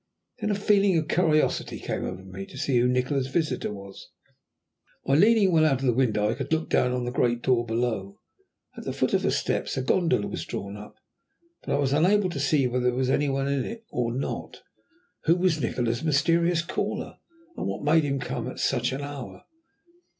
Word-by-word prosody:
Then 210 Hz, -, -2 dB
a 205 Hz, -, +1 dB
feeling 200 Hz, -2 st, +3 dB
of 155 Hz, -1 st, -1 dB
curiosity 155 Hz, -3 st, +1 dB
came -, -, -3 dB
over 95 Hz, -, -6 dB
me 95 Hz, +1 st, -8 dB
to -, -, -12 dB
see 135 Hz, -3 st, +1 dB
who 120 Hz, -, +3 dB
Nikola's 130 Hz, +2 st, 0 dB
visitor 155 Hz, -4 st, -1 dB
was. 100 Hz, -3 st, -10 dB, 1.0 s
By 135 Hz, -, +1 dB
leaning 205 Hz, +4 st, +5 dB
well 160 Hz, -2 st, +4 dB
out 135 Hz, -4 st, +2 dB
of -, -, -1 dB
the 125 Hz, -, +3 dB
window, 110 Hz, -4 st, +1 dB
I 110 Hz, -, +1 dB
could 135 Hz, +3 st, -6 dB
look 160 Hz, 0 st, 0 dB
down 125 Hz, -, +3 dB
on 125 Hz, -1 st, -2 dB
the 120 Hz, -, -2 dB
great 120 Hz, -1 st, 0 dB
door 120 Hz, -2 st, +2 dB
below. 110 Hz, -4 st, -2 dB, 0.6 s
At -, -, -8 dB
the -, -, -4 dB
foot -, -, 0 dB
of -, -, +3 dB
the -, -, +1 dB
steps -, -, -1 dB
a 130 Hz, -, -1 dB
gondola 165 Hz, -, +2 dB
was -, -, -4 dB
drawn 100 Hz, +1 st, -6 dB
up, 105 Hz, 0 st, -11 dB, 0.7 s
but -, -, -1 dB
I -, -, +1 dB
was 140 Hz, -1 st, +1 dB
unable 185 Hz, +5 st, +3 dB
to 145 Hz, -, -4 dB
see 140 Hz, 0 st, +2 dB
whether 125 Hz, 0 st, -1 dB
there 125 Hz, 0 st, +2 dB
was 130 Hz, 0 st, +1 dB
any 145 Hz, +1 st, +2 dB
one 135 Hz, 0 st, -1 dB
in 140 Hz, -2 st, 0 dB
it 225 Hz, 0 st, -7 dB
or 120 Hz, -1 st, -1 dB
not. 130 Hz, +3 st, -5 dB, 0.6 s
Who 165 Hz, -, +5 dB
was 175 Hz, -4 st, +1 dB
Nikola's 120 Hz, 0 st, -1 dB
mysterious 165 Hz, +3 st, +2 dB
caller, 170 Hz, -, -4 dB, 0.4 s
and -, -, -3 dB
what -, -, -4 dB
made 155 Hz, +2 st, +4 dB
him 140 Hz, -1 st, -1 dB
come 125 Hz, -1 st, -4 dB
at 130 Hz, -, -7 dB
such 125 Hz, -2 st, 0 dB
an 135 Hz, -, -4 dB
hour? 140 Hz, -3 st, -7 dB
135 Hz, 210 wpm, -26 LUFS, 120-160 Hz, 1.0 s, leaning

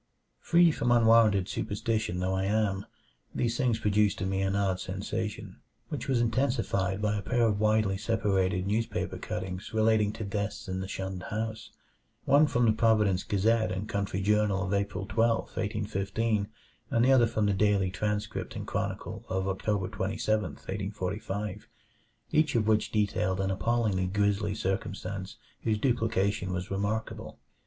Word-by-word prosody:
Free 170 Hz, 0 st, +5 dB
from 120 Hz, -5 st, 0 dB
unwarranted 115 Hz, -5 st, +5 dB
superstition 110 Hz, -3 st, -2 dB
though 95 Hz, +1 st, 0 dB
I 95 Hz, 0 st, 0 dB
am, 100 Hz, -1 st, 0 dB, 0.5 s
these 120 Hz, -1 st, 0 dB
things 120 Hz, -3 st, +1 dB
produced 105 Hz, -2 st, +2 dB
in 95 Hz, +1 st, -1 dB
me 95 Hz, 0 st, 0 dB
an 95 Hz, 0 st, 0 dB
odd 95 Hz, -2 st, +1 dB
sensation, 100 Hz, +3 st, -4 dB, 0.3 s
which -, -, -4 dB
was 130 Hz, -3 st, +2 dB
intensified 115 Hz, -5 st, 0 dB
by 105 Hz, 0 st, +1 dB
a -, -, -2 dB
pair 120 Hz, +4 st, +1 dB
of 105 Hz, -2 st, +1 dB
widely 110 Hz, -2 st, +2 dB
separated 95 Hz, -4 st, +1 dB
newspaper 110 Hz, +3 st, -2 dB
cuttings 95 Hz, +3 st, -5 dB
relating 110 Hz, -1 st, +3 dB
to 110 Hz, -, -5 dB
deaths 105 Hz, +2 st, -3 dB
in 95 Hz, 0 st, -3 dB
the 95 Hz, -, -4 dB
shunned 95 Hz, -1 st, -4 dB
house 110 Hz, +1 st, -4 dB, 0.6 s
one 145 Hz, +3 st, +5 dB
from 120 Hz, -3 st, +2 dB
the 110 Hz, -, +5 dB
Providence 110 Hz, -4 st, +3 dB
Gazette 110 Hz, 0 st, +1 dB
and 95 Hz, +3 st, -3 dB
Country 100 Hz, -2 st, -2 dB
Journal 105 Hz, -1 st, +2 dB
of 95 Hz, -, -2 dB
April 100 Hz, -1 st, -1 dB
12, 115 Hz, +2 st, +2 dB
1815, 105 Hz, +1 st, -1 dB, 0.4 s
and 115 Hz, +1 st, +3 dB
the 135 Hz, -, +5 dB
other 125 Hz, -3 st, +6 dB
from 110 Hz, -2 st, 0 dB
the 100 Hz, -, +2 dB
Daily 100 Hz, -2 st, +2 dB
Transcript 105 Hz, +2 st, -3 dB
and -, -, -5 dB
Chronicle -, -, -4 dB
of 95 Hz, 0 st, -1 dB
October 95 Hz, 0 st, -1 dB
27, 105 Hz, +2 st, -1 dB
1845 100 Hz, +1 st, -4 dB, 0.6 s
each 155 Hz, -3 st, +2 dB
of 110 Hz, -2 st, +2 dB
which 110 Hz, -1 st, +2 dB
detailed 100 Hz, -3 st, 0 dB
an 95 Hz, 0 st, 0 dB
appallingly 105 Hz, -2 st, 0 dB
grisly 100 Hz, +1 st, 0 dB
circumstance 95 Hz, -2 st, -3 dB, 0.2 s
whose 110 Hz, -2 st, +1 dB
duplication 105 Hz, -6 st, 0 dB
was 90 Hz, 0 st, -4 dB
remarkable. 100 Hz, +3 st, -3 dB
105 Hz, 150 wpm, -29 LUFS, 95-110 Hz, 0.6 s, other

